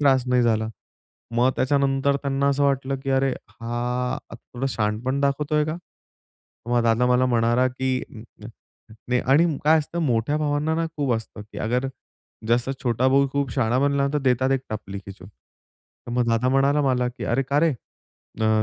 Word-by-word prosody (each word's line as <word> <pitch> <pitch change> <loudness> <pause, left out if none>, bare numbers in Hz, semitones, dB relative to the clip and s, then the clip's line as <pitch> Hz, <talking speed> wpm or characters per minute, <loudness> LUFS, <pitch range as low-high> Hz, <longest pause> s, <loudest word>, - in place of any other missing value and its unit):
त्रास 135 -3 +3
नाही 125 -1 +3
झाला." 110 -1 +1 0.7
मग 125 +2 +4
त्याच्यानंतर 140 0 +2
त्यांना 140 0 0
असं 140 +1 +1
वाटलं 135 -1 0
की 135 - -1
अरे, 135 0 +2 0.2
हा 115 +1 -7 0.4
आता - - -10
थोडं 125 +3 -6
शहाणपण 110 +4 -1
दाखवतोय 150 +2 +1
का? 155 +2 -3 0.9
मग 120 -1 +2
दादा 115 +2 +2
मला 125 +1 +3
म्हणाला 120 +1 +2
की 130 0 -2 1.1
नाही 125 0 +2
आणि 140 +6 +5 0.2
काय 160 +1 +5
असतं 165 +3 -4
मोठ्या 125 +1 +1
भावांना 150 +1 0
ना, 165 0 0
खूप 140 -4 0
असतं 110 -2 -6
की - - -7
अगर 125 +4 0 0.6
जसं 120 +3 +2
छोटा 125 +1 +1
भाऊ 140 +1 +3
खूप 140 -2 -1
शहाणा 115 +3 +1
बनला, 140 0 +2
तर 150 - +3
देतात 130 -1 +1
एक 135 - +1
टपली 100 -2 -5
खेचून. 95 -1 -11
तर 115 +3 -19
मग 120 -1 +1
दादा 115 +2 +2
म्हणाला 140 +2 +3
मला 125 -2 +1
की 125 - -7
"अरे 130 +4 +1
का 145 +1 +2
रे, 165 - +4 0.7
अ, 110 0 +3
130 Hz, 170 wpm, -23 LUFS, 120-140 Hz, 1.1 s, आणि